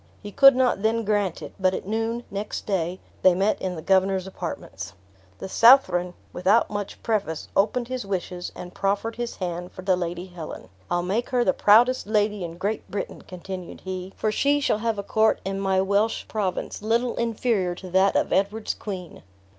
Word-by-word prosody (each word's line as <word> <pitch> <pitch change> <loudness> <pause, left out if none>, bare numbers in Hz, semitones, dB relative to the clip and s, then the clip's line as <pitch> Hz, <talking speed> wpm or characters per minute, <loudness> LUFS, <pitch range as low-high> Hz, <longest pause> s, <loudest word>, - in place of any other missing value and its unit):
He 205 - -7
could 275 +4 +7
not 250 -6 +2
then 225 +2 +1
grant 205 -4 0
it; - - -8
but 185 -1 +2
at - - -5
noon, 225 +3 -2
next 200 +1 -4
day, 185 -2 -1 0.2
they 185 -1 +6
met 195 +3 +1
in 185 -1 -2
the 160 - -7
governor's 190 0 +2
apartments. 190 - -6 0.4
The - - -6
Southron, 185 -6 +5 0.2
without 195 +7 +3
much 205 -1 -5
preface, 205 -8 -2
opened 225 +5 +2
his 255 -1 -3
wishes, 180 -2 -4
and 180 0 -8
proffered 200 +4 -1
his 240 -1 -4
hand 175 -1 -4
for 185 - -10
the 190 -1 +3
Lady 175 0 -4
Helen. 175 -4 -9 0.2
"I'll 175 0 0
make 205 +7 -1
her 250 -1 +2
the 185 - +3
proudest 240 +3 +4
lady 210 -2 +1
in 170 0 -6
Great 205 +4 -3
Britain," 200 - -5
continued 185 0 -8
he; 185 0 -5
"for 215 - 0
she 285 +6 +2
shall 260 -6 +1
have 225 -1 -1
a 200 - -3
court 220 +2 +2
in 195 0 -2
my 190 -1 +1
Welsh 200 +3 +1
province, 205 -3 -3
little 230 +3 +1
inferior 225 -6 0
to 185 0 -10
that 190 +2 +3
of - - +1
Edward's 205 +3 0
queen." 185 -5 -7
195 Hz, 185 wpm, -25 LUFS, 185-220 Hz, 0.4 s, could